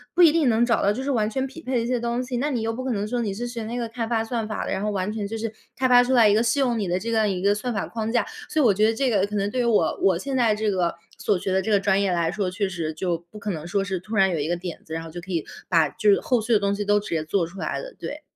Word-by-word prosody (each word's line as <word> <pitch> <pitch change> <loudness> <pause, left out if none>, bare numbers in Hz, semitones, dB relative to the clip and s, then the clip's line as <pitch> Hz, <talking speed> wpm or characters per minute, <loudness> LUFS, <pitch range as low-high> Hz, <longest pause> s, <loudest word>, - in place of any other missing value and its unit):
不 355 - +6
一 325 - +8
定 310 -6 +3
能 225 +1 +3
找 235 - +2
到 200 - +3
就 255 +6 -3
是 280 - -1
完 215 -5 +1
全 265 +4 -1
匹 275 +5 -9
配 250 -5 -1
一 - - -3
些 245 0 0
东 235 +1 -1
西， 250 -1 -3
那 285 +5 0
你 245 -5 -1
又 225 - -1
不 255 +3 -5
可 260 - -2
能 210 -2 -1
说 240 +2 -1
你 210 -3 -1
是 240 +3 -4
学 235 -2 -5
那 235 +3 -4
个 235 - -2
开 230 0 -3
发 225 -1 0
算 225 -1 -3
法 215 - -3
的， - - -4
然 195 - -1
后 210 - -1
完 195 0 -1
全 205 -2 -3
就 225 - -4
是 225 0 -4 0.2
开 260 - +2
发 245 -1 +7
出 260 +1 0
来 230 -4 +6
一 205 - +4
个 215 - +3
适 235 +4 +1
用 245 -4 +1
你 200 - -1
的 175 +1 0
这 230 +5 -3
样 220 -2 +2
一 185 - -1
个 200 +1 +4
算 230 +4 -3
法 200 -4 -2
框 225 -1 -3
架， 235 - +2 0.2
所 315 - 0
以 275 - +4
我 205 - +5
觉 215 +3 +3
得 225 - +1
这 265 +1 +1
个 200 -2 +2
可 210 - -6
能 200 0 0
对 255 - 0
于 240 - 0
我 230 -3 +2
我 185 -3 +4
现 270 +8 -4
在 235 -4 +3
这 215 0 0
个 180 -3 0 0.2
所 200 - +1
学 190 - -3
的 190 - +2
这 190 - -4
个 205 -2 +4
专 200 0 +2
业 195 - +1
来 170 -1 +1
说， 195 -1 -1
确 195 +2 -1
实 170 -4 -3
就 175 0 -1
不 215 - -12
可 205 0 -3
能 160 0 -5
说 195 +2 0
是 190 -2 -3
突 215 +5 -6
然 190 -2 +4
有 165 - -1
一 145 - -1
个 175 - 0
点 175 -1 -6
子， 160 - -9
然 165 - -4
后 165 - -9
就 175 +2 -7
可 185 +2 -9
以 165 -3 -1 0.2
把 165 -4 +4
就 215 +2 +1
是 200 - +5
后 245 -3 +1
续 230 +2 -4
的 - - +6
东 200 0 0
西 205 - -2
都 205 0 +3
直 205 - -8
接 160 -2 0
做 170 +2 0
出 180 +4 -11
来 - - -2
的， - - -9
对。 - - -6
215 Hz, 390 characters per minute, -24 LUFS, 190-240 Hz, 0.2 s, 一